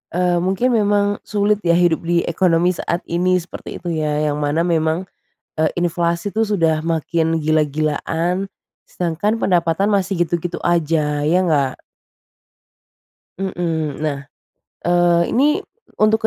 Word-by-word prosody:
Eee, 180 -1 +2
mungkin 195 +7 +1
memang 205 -1 +2
sulit 205 0 +1
ya 170 - +3
hidup 175 -2 +2
di 170 0 +2
ekonomi 170 0 +2
saat 170 +1 -2
ini 180 +2 +1
seperti 175 - -9
itu 175 - -3
ya, 150 -1 0
yang 145 - -3
mana 145 +2 0
memang, 165 0 0 0.5
e 155 - 0 0.2
inflasi 170 +2 -1
itu 220 - +1
sudah 165 -7 +1
makin 165 0 0
gila-gilaan, 155 +4 0 0.4
sedangkan 180 +6 -1
pendapatan 175 0 +1
masih 190 -3 +1
gitu-gitu 175 +1 -3
aja, 155 -3 +1
ya 165 +5 +3
nggak? 140 -5 +2 1.7
Heeh. 165 -6 -2
Nah, 150 -2 -1 0.7
eee, 175 0 +3
ini 290 +5 +2 0.3
untuk 220 +1 +3
170 Hz, 125 wpm, -19 LUFS, 160-185 Hz, 1.7 s, ya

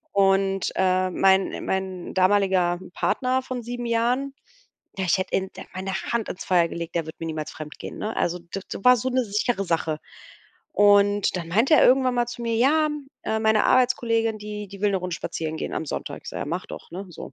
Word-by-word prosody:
Und, 195 -1 +2
äh, 185 0 +2
mein 190 +1 +2
mein 190 -2 -3
damaliger 185 -2 +3
Partner 255 +5 0
von 255 -1 -5
7 240 +1 -5
Jahren, 240 +4 0 0.6
ja, 190 - -1
ich 180 +1 +2
hätte 185 - -1
in 190 0 -1
de - - -7
meine 190 +1 -3 0.2
Hand 235 -2 0
ins 185 - -6
Feuer 175 -2 +3
gelegt, 170 0 -6
der 165 -2 0
wird 160 - -8
mir 165 - -4
niemals 155 -1 -4
fremdgehen, 155 0 -8
ne? 215 +1 -3
Also 175 +1 0
d 170 +3 -7
d - - -6
war 250 0 +8
so 255 +3 -1
'ne 255 0 +1
sichere 210 0 0
Sache. 165 -3 -1 0.7
Und 205 -1 +4
dann 170 -2 -4
meinte 225 - +4
er - - +6
irgendwann 255 0 +4
mal 240 -1 +2
zu 240 +1 -7
mir: 230 -1 -1
„Ja, 300 +6 +4
hm, 295 -2 -5 0.2
äh, 220 - 0
meine 220 -1 +3
Arbeitskollegin, 230 -3 +2
die, 210 0 -6
die 195 0 -12
will 205 0 +2
'ne 195 - +1
Runde 180 -2 -3
spazieren 160 -1 -4
gehen - - -4
am - - -2
Sonntag." 150 - -5
Ich - - -7
sage: - - -5
„Ja, - - -3
mach 175 +5 -3
doch, - - -10
ne?" 190 +3 -6
so. 160 - -9
200 Hz, 215 wpm, -24 LUFS, 180-235 Hz, 0.7 s, war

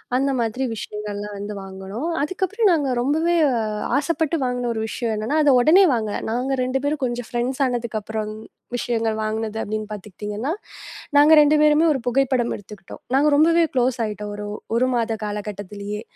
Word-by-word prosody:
அந்த 275 +2 +2
மாதிரி 235 +3 -1
விஷயங்கள் 210 -1 -6
எல்லாம் 205 0 -6
வந்து 205 +1 -5
வாங்குனோம். 195 - -6
அதுக்கப்புறம் 380 +8 0
நாங்க 295 -5 +1
ரொம்பவே 315 +7 +1 0.6
ஆசைப்பட்டு 320 +1 0
வாங்குன 250 -1 -1
ஒரு 220 - -3
விஷயம் 230 0 -2
என்னன்னா 220 +8 -1
அத 290 - +5
உடனே 320 +10 +6
வாங்கல. 215 -3 -1
நாங்க 250 +4 -1
2 255 +1 0
பேரும் 290 +1 -1
கொஞ்சம் 240 -1 -2
ஃப்ரெண்ட்ஸ் 250 +3 -2
ஆனதுக்கு 235 -3 -2
அப்புறம் 215 0 -4 0.4
விஷயங்கள் 230 -2 -1
வாங்குனது 220 0 -3
அப்படின்னு 215 0 -4
பாத்துக்கிட்டீங்கன்னா, 210 - -5 0.7
நாங்க 295 +2 +7
2 300 +1 +4
பேருமே 300 +1 +5
ஒரு 270 - -2
புகைப்படம் 250 -1 +1
எடுத்துக்கிட்டோம். 205 -2 -11
நாங்க 290 +3 +4
ரொம்பவே 335 +3 +5
க்ளோஸ் 250 0 +2
ஆயிட்டோம் 210 -1 -5
ஒரு, 205 0 -6 0.3
1 250 +2 +3
மாத 230 -1 0
காலகட்டத்திலேயே. 205 0 -5
240 Hz, 155 wpm, -22 LUFS, 210-280 Hz, 0.7 s, நாங்க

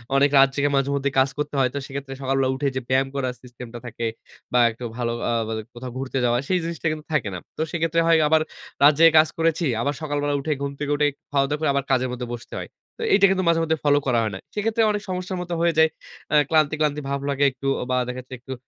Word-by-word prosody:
অনেক 140 +1 +5
রাত 135 0 +8
জেগে 145 0 +1
মাঝেমধ্যেই 140 0 0
কাজ 130 +1 +4
করতে 150 0 -3
হয়। 130 -1 +3
তো - - -3
সেক্ষেত্রে 135 0 -6
সকালবেলা 135 0 +1
উঠে 140 +1 -1
যে 130 - -1
ব্যায়াম 130 +1 +2
করার 130 -2 -1
সিস্টেম 125 0 -10
টা 120 - -6
থাকে, 115 -1 -5 0.5
বা 125 - +4
একটু 115 +2 -11
ভালো 120 -1 -1 0.2
আ - - +1 0.2
বা 110 - -3 0.2
কোথাও 125 +1 -7
ঘুরতে 135 0 -3
যাওয়া, 120 0 +2
সেই 185 - +2
জিনিসটা 165 -1 -3
কিন্তু 155 -1 -6
থাকে 125 -9 +1
না। - - -5 0.2
তো - - -2
সেক্ষেত্রে 165 0 +1
হয় 165 -1 +6
আবার 160 +1 +4 0.4
রাত 145 +2 +8
জেগে 165 0 +8
কাজ 155 - +5
করেছি। 165 +1 +1 0.2
আবার 145 +4 0
সকালবেলা 145 -1 -1
উঠেই 150 +1 -1
ঘুম 140 0 -2
থেকে 145 0 -2
উঠেই, 145 0 +2 0.2
খাওয়া-দাওয়া 145 +1 +1
করে 155 -2 +1
আবার 140 0 0
কাজের 130 -1 +2
মধ্যে 125 0 -5
বসতে 120 - -11
হয়। - - -7 0.3
তো - - -3
এইটা 200 0 +6
কিন্তু 190 -1 +1
মাঝে-মধ্যে 165 -1 +2
ফলো 145 -1 +4
করা 120 -3 +3
হয় 110 - -1
না। - - -7
সেক্ষেত্রে 220 +2 0
অনেক 210 0 -2
সমস্যার 185 0 -3
মত 175 0 -7
হয়ে 170 0 +3
যায়। 160 0 +6 0.4
অ্যা 150 - +5
ক্লান্তি, 155 -2 +3
ক্লান্তি 150 -1 0
ভাব 140 0 -1
লাগে 140 0 0
একটু। 130 +2 -6
অ - - -2
বা 125 - +2
দেখা 125 +1 -5 0.2
একটু 130 +2 -7
140 Hz, 240 wpm, -23 LUFS, 130-160 Hz, 0.5 s, রাত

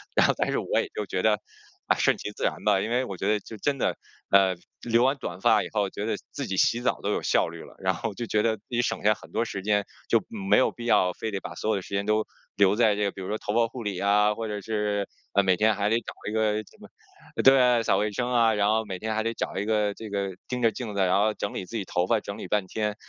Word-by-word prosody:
然 - - +5
后 - - +3
但 - - 0
是 - - 0
我 - - 0
也 - - -1
就 105 - -2
觉 95 - -2
得， 105 -1 +3 0.5
哎， - - +4
顺 - - +3
其 105 - -5
自 - - -8
然 - - -1
吧。 95 - +4
因 110 - -2
为 125 +2 +1
我 100 - -6
觉 95 - -2
得 105 0 +2
就 110 - -10
真 140 +6 0
的， - - 0 0.4
呃， 95 -1 +5 0.3
留 120 0 +2
完 135 +2 +3
短 90 -8 -6
发 105 +1 +5
以 - - -5
后， 105 -2 +1
觉 100 - -6
得 110 -1 0 0.2
自 140 -4 -4
己 95 - -3
洗 120 +5 +3
澡 125 - 0
都 - - 0
有 - - 0
效 - - +2
率 - - -8
了， - - -14
然 - - +1
后 - - -4
就 120 - -4
觉 110 -1 +1
得 110 0 +1
自 100 - -30
己 120 -1 +1
省 - - -2
下 105 +1 +5
很 - - -14
多 115 +2 0
时 95 -3 -5
间， 105 0 +1 0.2
就 115 - +5
没 100 -2 +1
有 130 - +3
必 120 - -9
要 90 -6 +3
非 110 - -4
得 100 - -2
把 - - -8
所 110 - -3
有 - - +2
的 100 - -2
时 - - -12
间 100 0 0
都 110 0 +2 0.3
留 100 0 +4
在 110 -2 +4
这 105 - -1
个， 100 - +1
比 95 - -9
如 95 - -5
说 105 - -2
头 105 - -4
发 115 0 +3
护 120 +1 -8
理 100 -2 -2
呀， 105 +2 +3
或 115 -1 -4
者 105 -1 -4
是， 105 -1 -1 0.3
呃， 100 - +4
每 95 -1 +3
天 110 +1 +3
还 100 +1 0
得 115 - +3
找 120 - -6 0.2
一 - - -5
个 110 -1 +2
什 - - -21
么 - - -12 0.6
对， 125 -3 +6
扫 - - +2
卫 105 0 0
生 120 +4 -2
啊， 115 -2 +4
然 105 -1 +2
后 110 0 +1
每 95 -2 -5
天 110 0 -2
还 110 - +1
得 115 - -1
找 - - -4
一 100 - -1
个 105 -1 +1
这 110 +1 -9
个 100 -1 -2 0.2
盯 125 -1 -3
着 115 -1 +4
镜 110 -1 -6
子， 100 - +1
然 95 0 +3
后 105 +1 +2
整 100 - -4
理 - - -4
自 115 - -9
己 105 - -2
头 90 +1 0
发， 115 +1 +3
整 100 -1 -7
理 - - -7
半 105 -2 +1
天。 105 +1 -2
105 Hz, 325 characters per minute, -26 LUFS, 100-115 Hz, 0.6 s, 对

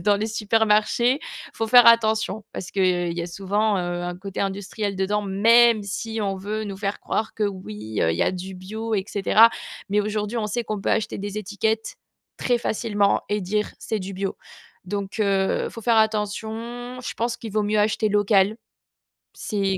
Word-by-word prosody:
dans 205 0 +3
les 215 +2 -2
supermarchés, 220 +4 +2
il - - -10
faut 225 - -2
faire 245 +1 +7
attention. 220 -2 +3
Parce 185 - -6
qu'il 180 -3 +1
y - - 0
a 170 - -3
souvent, 200 +4 0
heu, 175 0 -2
un 175 0 -4
côté 195 +1 -8
industriel 200 +1 -3
dedans, 200 +2 0
même 225 +3 +5
si 220 +3 -4
on 195 -1 -1
veut 210 +3 -4
nous 200 -2 -6
faire 200 0 -3
croire 220 0 -2
que, 215 - -3
oui, 110 - -4
heu, 80 - +3
il - - -3
y - - +2
a - - +2
du 185 +1 -6
bio 220 +5 -4
et 195 -2 0
cetera, 215 +3 +5 0.4
mais 205 +1 +2
aujourd'hui, 210 +2 -2
on 215 - -1
sait 235 +3 -2
qu'on 215 -2 -4
peut - - -1
acheter 220 -1 0
des 205 +1 -5
étiquettes 215 +2 -2 0.4
très 245 -1 +1
facilement 205 -3 +1
et 210 0 0
dire: 210 +3 -1
«C'est 220 - -2
du 195 +1 -6
bio». 195 +1 -3 0.5
Donc, 200 +2 -4
heu, 195 -2 +1
il - - -5
faut 230 - -9
faire 230 +1 +3
attention, 220 +3 -2
je 250 - -5
pense 235 +1 -1
qu'il 225 - -8
vaut 215 -1 +1
mieux 210 +1 +1
acheter 215 +1 +1
local. 205 0 +3 0.8
C'est 195 -2 -1
210 Hz, 195 wpm, -23 LUFS, 195-220 Hz, 0.8 s, faire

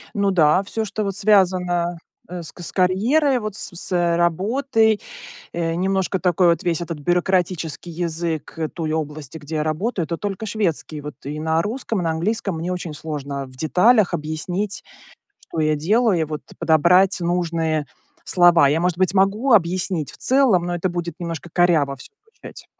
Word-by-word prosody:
Ну 200 -1 +2
да, 165 +1 +4
всё, 220 +3 -3
что 215 +1 -3
вот 195 -2 -3
связано, 180 -4 +2 0.3
э, 180 0 -5
с 165 - -8
к 175 - -12
с - - -5
карьерой, 245 +10 +2
вот 215 -3 -5
с - - -3
с 175 -1 0
работой. 220 - +1 0.5
Э, 165 -1 -1
немножко 190 +2 0
такой 180 0 +2
вот 170 +4 +1
весь 175 -2 0
этот 165 -3 -5
бюрократический 175 -1 -1
язык, 165 -2 -3
э, 160 - 0
той 160 0 -4
области, 155 -1 -4
где 155 +1 -7
я 150 - 0
работаю, 170 +6 -1
это 170 - -4
только 205 +2 -4
шведский. 180 -8 -2
Вот 145 -1 -8
и 150 +2 -5
на 160 +1 +1
русском, 225 0 -3
и - - -2
на 165 - 0
английском 195 +2 -2
мне 175 +3 -3
очень 175 -3 -5
сложно 145 -3 -5
в 130 -1 -15
деталях 185 - +3
объяснить, 175 +6 -3 0.7
что - - -4
я 155 -1 +2
делаю, 205 +5 +2
и - - +2
вот 155 -1 -5 0.2
подобрать 170 +4 +4
нужные 165 -3 -1 0.4
слова. 175 -5 +5
Я, 150 +3 +1
может 175 0 0
быть, 185 -1 +2
могу 200 +7 +2
объяснить 180 -4 +1
в - - -13
целом, 255 -9 +3
но 175 - -2
это 175 +2 -1
будет 170 -2 -4
немножко 170 -1 -5
коряво 160 -6 +2
всё 430 - -12
звучать. 450 - -13
175 Hz, 175 wpm, -21 LUFS, 160-195 Hz, 0.7 s, слова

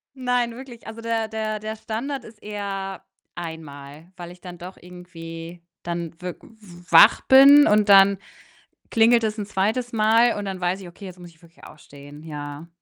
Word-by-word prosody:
Nein, 245 -2 -1
wirklich, 250 -3 -12
also, 220 +1 -9
der 230 -1 -2
der 215 -1 -4
der 215 +1 -6
Standard 245 +5 -5
ist 215 -1 -16
eher 195 -2 -6 0.3
einmal, 160 -1 -10
weil 175 -1 -9
ich 180 - -18
dann 175 -1 -11
doch 180 +2 -10
irgendwie 170 -1 -11 0.2
dann 170 -1 -5
wirk 180 -1 -7
w 180 -6 -17
wach 165 - +7
bin 280 +2 +7
und 210 0 +3
dann 195 -1 +6 0.7
klingelt 230 0 +4
es 215 0 -2
'n 205 - -4
2. 220 +5 -2
Mal 225 +2 +3
und 205 - -5
dann 190 -1 -5
weiß 180 +2 -1
ich: 180 - -10
„Okay, 175 +4 -13
jetzt 185 -1 -11
muss 175 -1 -12
ich 165 -1 -25
wirklich 170 -1 -21
aufstehen“, 145 0 -14
ja. 145 0 -8
195 Hz, 180 wpm, -23 LUFS, 170-220 Hz, 0.7 s, wach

